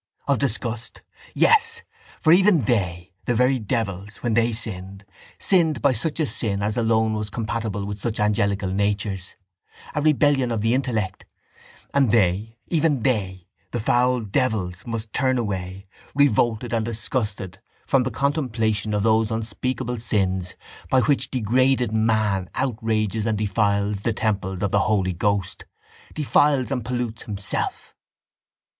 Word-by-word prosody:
Of 140 - +2
disgust, 120 -3 -2 0.3
yes! 460 +1 +3 0.4
For 155 - +5
even 185 -5 +5
they, 90 -5 -1
the 120 - +1
very 125 +2 +3
devils, 105 -2 -3
when 120 -2 +1
they 115 +1 +3
sinned, 100 -3 -5 0.3
sinned 165 -6 +2
by 140 - +3
such 150 +8 -1
a 155 - +2
sin 100 -7 0
as 105 +1 -1
alone 110 -1 +2
was 105 -1 -2
compatible 110 -2 -3
with 100 +1 -5
such 110 +2 -3
angelical 100 -2 +1
natures, 100 -1 -1 0.6
a 150 - -1
rebellion 145 -4 +3
of 115 -2 -1
the 115 +2 +2
intellect: 115 -8 -1 0.7
and 140 -4 +3
they, 105 +1 +1
even 155 -7 +1
they, 95 -8 -1 0.2
the 120 - -3
foul 125 +2 +2
devils 105 -5 -1
must 115 -2 -5
turn 130 -2 +1
away, 95 -4 -4 0.3
revolted 120 -4 +2
and 115 -1 +1
disgusted, 105 -5 -3 0.3
from 135 - +3
the 130 - -1
contemplation 110 -5 0
of 105 - 0
those 110 0 +3
unspeakable 120 +2 -3
sins 95 -4 0 0.3
by 130 - +4
which 140 +1 +1
degraded 125 0 +2
man 110 -4 +1
outrages 110 -4 -1
and 110 -1 0
defiles 100 -1 0
the 115 - 0
temple 100 -3 -2
of 100 - 0
the 100 - +3
Holy 95 -3 +1
Ghost, 100 +2 -1 0.5
defiles 145 -3 +2
and 125 -3 -1
pollutes 120 -2 -3
himself. 100 -3 -4
110 Hz, 140 wpm, -23 LUFS, 100-125 Hz, 0.7 s, For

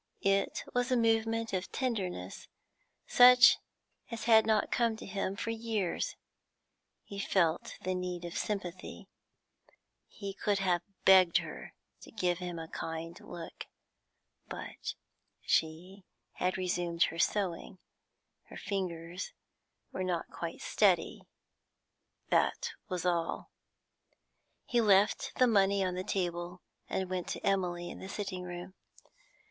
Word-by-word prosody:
It 195 0 +1
was 245 +1 0
a 250 - +4
movement 225 -1 +1
of 185 0 -2
tenderness 190 - -3 0.6
such 250 0 +8 0.5
as 230 -2 -5
had 220 -2 +6
not 215 -1 +2
come 235 -2 +2
to - - -9
him 195 0 -2
for 230 - -3
years; 225 - -2 0.9
he 200 - -8
felt 175 -5 +1
the 185 - 0
need 180 -1 -4
of 170 - -6
sympathy; 185 -4 -4 1.0
he 200 -2 -7
could 205 0 0
have 180 -3 +1 0.2
begged 185 -3 +7
her - - -6 0.3
to - - -12
give 180 -5 0
him 180 -2 -5
a 165 0 -6
kind 165 +1 -5
look. 165 -1 -9 0.8
But - - -6 0.5
she 180 +5 -1 0.3
had 180 +1 -1
resumed 175 -2 0
her 165 - -1
sewing; 190 0 0 0.7
her - - -11
fingers 180 - -4 0.6
were 185 - -3
not 175 -2 -2
quite - - -6
steady, - - +2 1.1
that 475 -2 +1 0.2
was 180 -2 -3
all. 170 -2 -1 1.1
He 240 -1 +2
left 205 -1 +3
the 255 - +5
money 200 -4 +3
on 180 - -1
the 180 +1 -3
table 175 -1 -3 0.3
and 190 - -1
went 180 -1 -3
to - - -5
Emily 175 -3 0
in - - -9
the 190 - -8
sitting 195 -3 -4
room. 180 +1 -7
190 Hz, 125 wpm, -32 LUFS, 175-210 Hz, 1.1 s, such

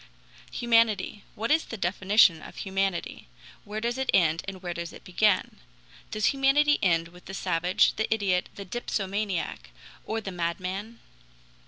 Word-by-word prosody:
Humanity! 230 -4 +2
Where 225 +5 -2
is 320 +1 +3
the 225 - -7
definition 185 -2 +4
of - - -11
humanity? 195 - -2 0.4
Where 210 +1 -4
does 235 +3 -2
it 265 - -2
end 165 -2 +3
and 190 -1 -7
where 175 -1 -3
does 170 0 -5
it - - -12
begin? 200 +1 +1 0.5
Does 215 +5 +1
humanity 285 +2 +3
end 170 -3 +2
with 180 +1 -17
the 190 - -7
savage, 180 +1 +2
the 220 - -1
idiot, 195 -5 +1
the 200 - -7
dipsomaniac, 200 -3 -3 0.3
or 225 - -2
the 200 -3 -6
madman? 185 +6 -4
195 Hz, 150 wpm, -27 LUFS, 180-225 Hz, 0.5 s, definition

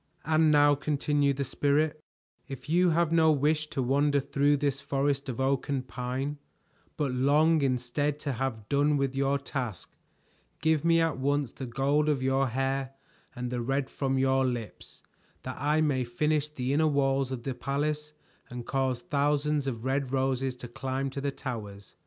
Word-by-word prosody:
"And 160 0 +4
now," 145 -1 +5
continued 145 -1 0
the 140 - 0
Spirit, 150 +3 0 0.4
"if 135 -1 -8
you 175 +3 +3
have 165 0 +2
no 160 -1 +5
wish 150 +1 +1
to 135 -3 -2
wander 140 +3 +2
through 145 +2 +2
this 140 -1 -1
forest 140 0 -1
of 125 - -5
oak 135 +1 0
and 135 -2 -2
pine, 130 +4 -4 0.6
but 145 -4 0
long 150 +5 +3
instead 135 +3 0
to 145 - -2
have 115 -4 -3
done 145 +2 +2
with 135 -1 -1
your 140 +1 +1
task, 130 - -5 0.6
give 160 -2 +2
me 165 0 +4
at 165 -4 0
once 140 -1 0
the 130 - -7
gold 140 +5 +1
of 140 -3 0
your 135 +1 +2
hair 135 +2 -2 0.4
and 125 0 -4
the 125 -1 -2
red 135 +2 -1
from 135 -1 -1
your 135 0 +3
lips, 120 -4 -5 0.4
that 130 0 -6
I 150 +2 +2
may 140 -4 +1
finish 150 +5 0
the 130 -2 -2
inner 155 +2 +3
walls 135 -2 +1
of 125 -3 -5
the 135 - -2
palace 150 +3 -2 0.4
and 120 -1 -7
cause 130 -2 -1
thousands 145 -2 0
of 120 -2 -4
red 135 0 -1
roses 130 -1 0
to 125 -1 -9
climb 135 +2 -3
to 140 - -5
the 140 - 0
towers." 105 -8 -7
140 Hz, 175 wpm, -28 LUFS, 130-145 Hz, 0.6 s, now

